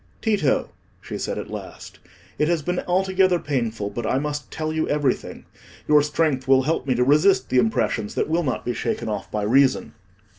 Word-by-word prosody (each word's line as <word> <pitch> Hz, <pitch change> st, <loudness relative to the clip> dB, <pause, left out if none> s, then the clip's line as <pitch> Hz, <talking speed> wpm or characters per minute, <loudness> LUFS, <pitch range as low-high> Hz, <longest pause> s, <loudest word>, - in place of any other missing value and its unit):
"Tito," 205 Hz, -, +1 dB, 0.3 s
she -, -, -7 dB
said -, -, -3 dB
at -, -, -6 dB
last, -, -, -9 dB, 0.4 s
"it 150 Hz, -, +2 dB
has 170 Hz, -3 st, 0 dB
been 180 Hz, +2 st, -1 dB
altogether 185 Hz, 0 st, +2 dB
painful, 115 Hz, -9 st, -2 dB
but 120 Hz, +4 st, -4 dB
I 120 Hz, -, 0 dB
must 145 Hz, +1 st, -3 dB
tell 155 Hz, 0 st, -3 dB
you 160 Hz, 0 st, -1 dB
everything. 145 Hz, -3 st, -1 dB, 0.4 s
Your 150 Hz, -1 st, +6 dB
strength 145 Hz, -3 st, 0 dB
will 135 Hz, 0 st, +5 dB
help 150 Hz, -1 st, -1 dB
me 130 Hz, -, +2 dB
to 125 Hz, -, +2 dB
resist 150 Hz, +9 st, +3 dB
the 130 Hz, -, +3 dB
impressions 110 Hz, -2 st, 0 dB
that -, -, 0 dB
will 165 Hz, +2 st, +1 dB
not 135 Hz, -6 st, -3 dB
be 120 Hz, -, -1 dB
shaken 115 Hz, -, -3 dB
off 105 Hz, -2 st, -4 dB
by 105 Hz, -1 st, -2 dB
reason." 130 Hz, +5 st, +2 dB
145 Hz, 190 wpm, -23 LUFS, 125-160 Hz, 0.4 s, Your